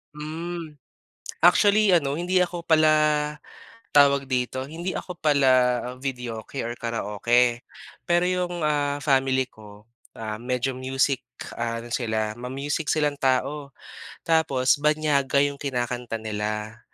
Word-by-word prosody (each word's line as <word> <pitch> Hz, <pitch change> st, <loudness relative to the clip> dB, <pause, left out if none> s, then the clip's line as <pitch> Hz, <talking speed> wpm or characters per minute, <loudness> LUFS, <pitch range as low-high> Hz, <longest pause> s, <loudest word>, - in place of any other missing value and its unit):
Hmm. 160 Hz, 0 st, -6 dB, 0.7 s
Actually 205 Hz, +2 st, +5 dB
ano, 145 Hz, -3 st, +1 dB
hindi 180 Hz, +1 st, +1 dB
ako 175 Hz, -1 st, -4 dB
pala, 150 Hz, -2 st, +3 dB, 0.6 s
tawag 140 Hz, -1 st, +5 dB
dito, 130 Hz, 0 st, -2 dB
hindi 170 Hz, +5 st, -5 dB
ako 180 Hz, -, -7 dB
pala 145 Hz, -4 st, +2 dB, 0.6 s
videoke 125 Hz, -2 st, -5 dB
or 120 Hz, -, -4 dB
karaoke. 120 Hz, +1 st, 0 dB, 0.4 s
Pero 175 Hz, 0 st, +3 dB
'yong 180 Hz, -1 st, -1 dB
ah, 145 Hz, -1 st, 0 dB
family 135 Hz, -2 st, +2 dB
ko, 105 Hz, -2 st, -15 dB, 0.3 s
ah, 110 Hz, -1 st, -5 dB
medyo 125 Hz, +1 st, -1 dB
music 130 Hz, +1 st, 0 dB, 0.3 s
ano 115 Hz, 0 st, -3 dB
sila, 110 Hz, -3 st, -1 dB
ma-music 135 Hz, +6 st, -3 dB
silang 150 Hz, -2 st, +1 dB
tao. 140 Hz, +2 st, 0 dB, 0.5 s
Tapos 145 Hz, -5 st, +2 dB
banyaga 150 Hz, -2 st, +2 dB
'yong 140 Hz, -1 st, -2 dB
kinakanta 120 Hz, -3 st, -3 dB
nila. 110 Hz, +1 st, -4 dB
140 Hz, 115 wpm, -25 LUFS, 120-155 Hz, 0.7 s, Actually